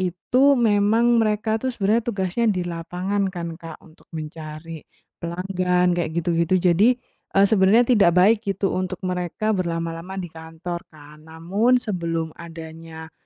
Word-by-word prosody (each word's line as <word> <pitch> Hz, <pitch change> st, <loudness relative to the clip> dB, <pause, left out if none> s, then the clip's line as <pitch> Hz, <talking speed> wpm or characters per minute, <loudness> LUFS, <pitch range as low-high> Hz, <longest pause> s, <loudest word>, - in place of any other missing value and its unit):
itu 245 Hz, +10 st, +2 dB
memang 225 Hz, +1 st, +3 dB
mereka 220 Hz, 0 st, +1 dB
tuh 260 Hz, -, -2 dB
sebenarnya 215 Hz, +1 st, +1 dB
tugasnya 195 Hz, +1 st, -1 dB
di 180 Hz, -2 st, -2 dB
lapangan 180 Hz, +4 st, -2 dB
kan, 170 Hz, -2 st, -5 dB
Kak. 165 Hz, -1 st, -8 dB
Untuk 160 Hz, -1 st, -21 dB
mencari 155 Hz, 0 st, -8 dB, 0.4 s
pelanggan 180 Hz, +1 st, 0 dB
kayak 170 Hz, -2 st, -2 dB
gitu-gitu. 170 Hz, +1 st, +1 dB
Jadi, 190 Hz, +8 st, +4 dB, 0.4 s
eee, 195 Hz, -, +6 dB
sebenarnya 210 Hz, +3 st, +4 dB
tidak 185 Hz, -6 st, +4 dB
baik 210 Hz, +4 st, +5 dB
gitu 195 Hz, -2 st, -2 dB
untuk 185 Hz, 0 st, -2 dB
mereka 180 Hz, +4 st, -1 dB
berlama-lama 170 Hz, 0 st, -3 dB
di 175 Hz, -4 st, -6 dB
kantor 165 Hz, +2 st, -7 dB
kan. 150 Hz, -1 st, -16 dB
Namun, 195 Hz, +10 st, +1 dB
sebelum 170 Hz, -8 st, -2 dB
adanya 165 Hz, -1 st, -10 dB
180 Hz, 135 wpm, -23 LUFS, 165-205 Hz, 0.4 s, eee